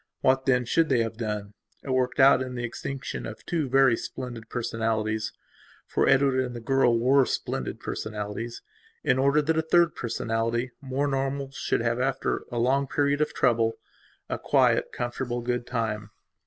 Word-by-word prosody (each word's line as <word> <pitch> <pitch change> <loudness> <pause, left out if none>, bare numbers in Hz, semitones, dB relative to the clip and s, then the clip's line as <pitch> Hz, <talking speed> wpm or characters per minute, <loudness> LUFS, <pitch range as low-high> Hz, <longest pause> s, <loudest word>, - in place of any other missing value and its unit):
What 130 +1 +2
then, 125 -2 +3
should 160 +7 +2
they 125 -4 +3
have 115 0 -4
done? 105 -3 -4 0.3
worked 130 -1 0
out 135 -1 +7
in 130 -1 -4
the 120 - -4
extinction 130 +3 -5
of 110 - -10
two 160 -6 -1
very 135 -2 +5
splendid 120 -2 -7
personalitiesfor 110 -2 -3
Edward 135 -1 +4
and 125 -1 -5
the - - -5
girl 120 0 +3
were 130 +4 +4
splendid - - -3
personalities, 110 +2 -5 0.4
in 125 +1 +2
order 140 +3 +3
that 160 +2 +1
a - - +3
third 170 +1 +3
personality, 115 +1 -2
more 135 +1 -1
normal, 135 0 -2
should 135 - -1
have, 115 +1 0
after 135 +1 -1
a 120 - -3
long 135 +4 +2
period 145 +1 +1
of 150 - 0
trouble, 115 -3 +2 0.5
a - - -3
quiet, - - +2
comfortable, 120 0 -3
good 120 0 -2
time. 110 -3 -2
125 Hz, 160 wpm, -26 LUFS, 115-135 Hz, 0.5 s, out